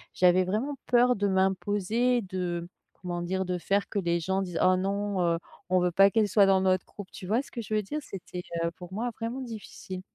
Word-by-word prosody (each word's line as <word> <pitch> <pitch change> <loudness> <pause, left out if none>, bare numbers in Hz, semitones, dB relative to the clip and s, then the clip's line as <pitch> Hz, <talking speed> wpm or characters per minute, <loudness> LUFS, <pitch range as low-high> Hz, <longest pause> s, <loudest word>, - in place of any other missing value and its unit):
J'avais 180 0 +4
vraiment 250 +9 -2
peur 245 0 +4
de 205 0 0
m'imposer, 205 +5 +1
de 175 -2 -3 0.3
comment 175 -1 -4
dire? 190 +2 -1
De 180 -1 -2
faire 200 +3 0
que 205 - -2
les 170 -1 +1
gens 190 +3 0
disent: 180 -3 -4
«Oh 185 0 +5
non, 200 0 -1
heu, 170 -1 +2 0.3
on 185 0 +4
veut 180 0 +1
pas 195 +3 +6
qu'elle 215 0 +2
soit 200 0 +5
dans 190 -1 +4
notre 185 -1 +2
groupe», 205 -2 -10
tu 185 - -9
vois 230 +7 +1
ce - - -16
que 235 - -4
je 215 0 -3
veux 210 - +1
dire? 300 +10 -4
C'était, 180 -5 -7 0.2
heu, 170 - -1
pour 180 0 -11
moi 235 +3 -2
vraiment 240 +4 -3
difficile. 210 -5 -7
190 Hz, 225 wpm, -28 LUFS, 180-215 Hz, 0.3 s, pas